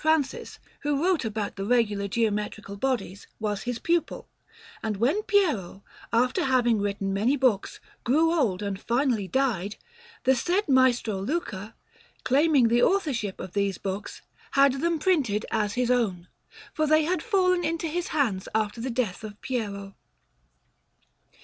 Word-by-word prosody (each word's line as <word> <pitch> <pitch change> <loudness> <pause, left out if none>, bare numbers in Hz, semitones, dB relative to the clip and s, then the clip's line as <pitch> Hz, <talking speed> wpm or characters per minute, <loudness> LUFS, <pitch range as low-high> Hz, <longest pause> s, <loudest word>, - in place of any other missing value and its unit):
Francis, 315 -3 0 0.2
who 290 0 -1
wrote 360 -4 +2
about 215 -2 -3
the 195 - -3
regular 210 -3 +1
geometrical 210 -1 -2
bodies, 220 -4 -2
was 210 -2 -2
his 245 - -2
pupil; 340 +6 -1 0.5
and 215 -2 -2
when 275 - +2
Piero, 290 - 0 0.3
after 250 +4 +2
having 245 -4 +3
written 200 -1 -2
many 230 +9 +2
books, 250 -7 +1 0.2
grew 320 +7 +3
old 215 - +1
and 200 -1 -4
finally 235 -5 0
died, 220 -6 0 0.5
the 265 +1 +4
said 360 - 0
Maestro 245 -6 +3
Luca, 215 - -4 0.5
claiming 280 -2 +4
the 240 +1 +3
authorship 275 - +1
of 185 - -7
these 200 -2 0
books, 195 +1 -5 0.3
had 275 -1 +4
them 335 0 +1
printed 285 - +1
as 210 -2 0
his 250 0 +1
own, 195 -8 0 0.5
for 310 0 0
they 310 +1 +4
had 345 +1 0
fallen 365 -5 +2
into 330 +1 -1
his 340 +2 -2
hands 230 -11 0
after 220 +1 -1
the 260 - -3
death 230 -5 -2
of 210 -1 -8
Piero. 200 -6 -4
240 Hz, 145 wpm, -26 LUFS, 205-295 Hz, 0.5 s, the